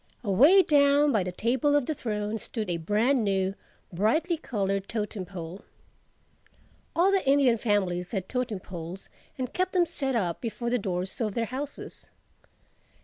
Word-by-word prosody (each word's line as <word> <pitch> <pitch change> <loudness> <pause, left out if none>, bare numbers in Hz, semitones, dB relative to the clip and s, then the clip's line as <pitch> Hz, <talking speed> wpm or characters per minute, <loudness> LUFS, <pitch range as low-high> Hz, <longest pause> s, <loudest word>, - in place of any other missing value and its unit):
Away 280 - +6
down 285 -1 +4
by 215 -6 +2
the 180 0 -3
Table 255 +9 +1
of 290 -3 +2
the 310 - -1
Throne 215 -4 -3
stood 215 -5 -3
a 170 - -1
brand 220 - +1
new, 195 -1 0 0.4
brightly 310 - +1
colored 195 -9 -2
totem 210 -3 -3
pole. 175 0 -8 1.3
All 360 +4 +4
the 390 -1 +2
Indian 270 -5 +4
families 185 -5 0
had 190 -4 -3
totem 250 -5 -2
poles 175 +1 -8 0.3
and 255 -2 -4
kept 370 0 -1
them 360 -2 +4
set 270 -5 -3
up 180 -7 -1
before 235 0 -3
the 250 - +2
doors 185 +1 -3
of 215 -3 -1
their 230 - 0
houses. 265 +5 -7
225 Hz, 155 wpm, -27 LUFS, 190-275 Hz, 1.3 s, Away